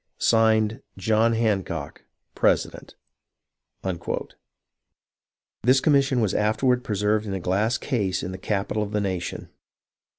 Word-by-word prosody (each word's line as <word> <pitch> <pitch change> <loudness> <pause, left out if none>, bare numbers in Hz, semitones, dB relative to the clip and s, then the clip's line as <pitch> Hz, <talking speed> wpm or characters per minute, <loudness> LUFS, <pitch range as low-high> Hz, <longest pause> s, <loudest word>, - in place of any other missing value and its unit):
(Signed) 110 +1 +3 0.2
John 110 +4 +2
Hancock, 95 -9 -2 0.3
President. - - 0 2.7
This 130 +4 +4
commission 135 -3 +3
was 105 -4 +1
afterward 120 +4 +1
preserved 105 +1 0
in 95 - -3
a - - -3
glass 105 +8 0
case 100 -9 -1
in 95 - -4
the 95 - -7
capital 105 +2 -1
of 105 0 -4
the 105 - +1
nation. 95 -3 -3
110 Hz, 110 wpm, -24 LUFS, 95-115 Hz, 2.7 s, This